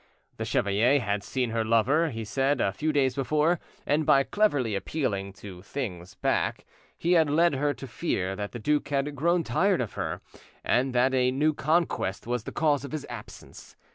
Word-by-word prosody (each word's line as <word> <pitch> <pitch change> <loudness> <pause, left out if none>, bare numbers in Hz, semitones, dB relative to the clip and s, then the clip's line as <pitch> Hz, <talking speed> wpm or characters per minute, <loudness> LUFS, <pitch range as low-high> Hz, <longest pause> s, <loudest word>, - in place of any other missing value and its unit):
The - - -3
chevalier 110 +8 +2
had 100 -4 -2
seen 125 -1 -2
her 115 0 0
lover, 120 +9 +3
he 115 -4 -5
said, 135 +4 0
a 100 - +2
few 155 +10 -1
days 135 -3 +2
before, 150 +5 +1 0.3
and 150 +2 +2
by 135 -2 +5
cleverly 145 - +1
appealing 100 -3 -2
to 95 -2 -10
things 95 -6 -6
back, - - -1 0.3
he 170 - 0
had 160 -4 +4
led 165 +2 +3
her 145 +2 +1
to - - -8
fear 105 - -2
that 100 +1 -5
the - - -6
duke 150 +6 0
had 145 +1 -1
grown 170 +4 +2
tired 180 +10 +2
of 120 -5 -3
her, - - -4 0.4
and 125 +1 +1
that 130 +2 +3
a 125 -1 +3
new 150 +4 +1
conquest 150 - 0
was 120 -1 -2
the - - -5
cause 145 -3 +1
of 140 - -7
his 155 -2 -4
absence. 115 -3 -11
135 Hz, 190 wpm, -27 LUFS, 110-150 Hz, 0.4 s, by